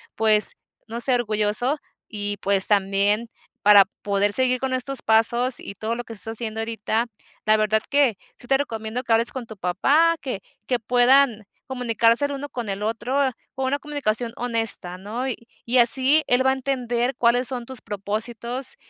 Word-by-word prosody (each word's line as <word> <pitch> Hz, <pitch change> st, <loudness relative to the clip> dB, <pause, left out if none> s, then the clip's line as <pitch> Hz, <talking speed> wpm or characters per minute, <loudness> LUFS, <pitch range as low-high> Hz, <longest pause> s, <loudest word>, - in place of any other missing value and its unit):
pues, 215 Hz, -1 st, +7 dB, 0.3 s
no 230 Hz, +1 st, -6 dB
sé, 255 Hz, +1 st, +4 dB
orgulloso 215 Hz, +4 st, -1 dB, 0.3 s
y, 205 Hz, -1 st, -4 dB
pues, 200 Hz, -1 st, +4 dB
también 205 Hz, +2 st, +1 dB, 0.3 s
para 205 Hz, -1 st, +7 dB, 0.2 s
poder 200 Hz, 0 st, 0 dB
seguir 255 Hz, +1 st, +1 dB
con 265 Hz, 0 st, -3 dB
estos 255 Hz, +1 st, -3 dB
pasos 235 Hz, +3 st, +3 dB
y -, -, -8 dB
todo 220 Hz, +3 st, -4 dB
lo 240 Hz, -, -5 dB
que 235 Hz, -, -13 dB
estás 225 Hz, +1 st, -3 dB
haciendo 220 Hz, -1 st, -4 dB
ahorita, 225 Hz, 0 st, -2 dB, 0.4 s
la 215 Hz, -, +4 dB
verdad 215 Hz, 0 st, +1 dB
que 280 Hz, -7 st, +2 dB, 0.2 s
sí -, -, -15 dB
te 270 Hz, +2 st, +2 dB
recomiendo 225 Hz, -3 st, -4 dB
que 235 Hz, -, 0 dB
hables 230 Hz, +1 st, +1 dB
con 260 Hz, -3 st, -7 dB
tu 220 Hz, -, -10 dB
papá, 280 Hz, -, +2 dB
que 250 Hz, -8 st, -5 dB, 0.3 s
que 250 Hz, -2 st, 0 dB
puedan 245 Hz, -1 st, +3 dB, 0.2 s
comunicarse 235 Hz, 0 st, +1 dB
el 285 Hz, -, -3 dB
uno 285 Hz, +1 st, -6 dB
con 240 Hz, -5 st, -6 dB
el 195 Hz, +1 st, -4 dB
otro, 250 Hz, +5 st, -1 dB, 0.2 s
con 265 Hz, -, -3 dB
una 280 Hz, +2 st, -1 dB
comunicación 245 Hz, -6 st, -2 dB
honesta, 225 Hz, -7 st, -1 dB
¿no? 220 Hz, +7 st, -5 dB
Y 235 Hz, -1 st, -7 dB, 0.2 s
y 245 Hz, +2 st, +1 dB
así, 265 Hz, +5 st, +3 dB
él 250 Hz, +1 st, +2 dB
va -, -, +4 dB
a -, -, +3 dB
entender 255 Hz, -2 st, -2 dB
cuáles 245 Hz, +1 st, +2 dB
son 245 Hz, -2 st, -5 dB
tus 260 Hz, -1 st, -10 dB
propósitos 225 Hz, -, -5 dB
235 Hz, 180 wpm, -22 LUFS, 215-260 Hz, 0.4 s, pues